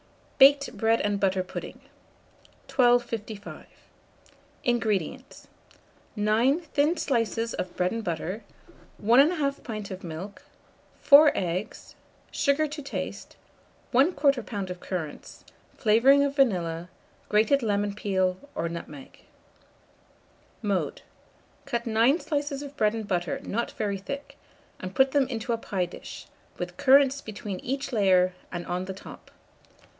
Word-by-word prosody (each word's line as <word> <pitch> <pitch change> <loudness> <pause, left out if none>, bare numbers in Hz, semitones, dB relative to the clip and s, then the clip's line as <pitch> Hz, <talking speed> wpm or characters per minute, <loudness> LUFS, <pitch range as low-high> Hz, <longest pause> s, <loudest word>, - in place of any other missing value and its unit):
BAKED 280 -1 +6
BREAD 225 +2 +2
AND 205 -1 0
BUTTER 190 -1 +1
PUDDING. - - -8 0.9
1255. 235 -4 0 1.0
INGREDIENTS. 240 - -2 0.7
9 225 +9 +2
thin 315 +1 +1
slices 230 -5 -1
of 180 - -5
bread 180 0 +1
and 230 0 -3
butter, 180 +4 -4 0.5
1 245 +8 +5
1/2 285 -5 -2
pint 215 -4 -6
of 190 0 -7
milk, 175 +5 -7 0.6
4 290 +1 +8
eggs, 185 +3 -4 0.4
sugar 280 +2 +2
to 300 +1 -7
taste, 275 - -6 0.6
1/4 280 +9 +4 0.3
lb. 200 -5 -5
of 180 - -7
currants, 170 -6 -6 0.3
flavouring 250 +6 +5
of 280 0 -1
vanilla, 175 - +1 0.4
grated 220 +7 +3
lemon 205 -2 0
peel 190 -3 0 0.2
or 165 - -1
nutmeg. 150 -5 -9 1.4
Mode. 200 -3 -1 0.6
Cut 235 0 -2
9 230 +7 +3
slices 290 -3 -3
of 285 0 -9
bread 215 -4 +2
and 220 -2 -5
butter 175 -4 -1
not 235 +3 -2
very 200 -2 -2
thick, 275 +9 -7 0.4
and 185 0 -7
put 265 0 +4
them 280 -2 +2
into 235 -1 -3
a - - 0
pie 190 -5 -2
dish, 175 - -10 0.3
with - - -6
currants 275 +1 +5
between 205 -3 -6
each 275 +1 -4
layer 185 -4 +3 0.2
and 175 0 -5
on 180 +1 -3
the 190 - -5
top. - - -12
220 Hz, 125 wpm, -27 LUFS, 190-270 Hz, 1.4 s, 4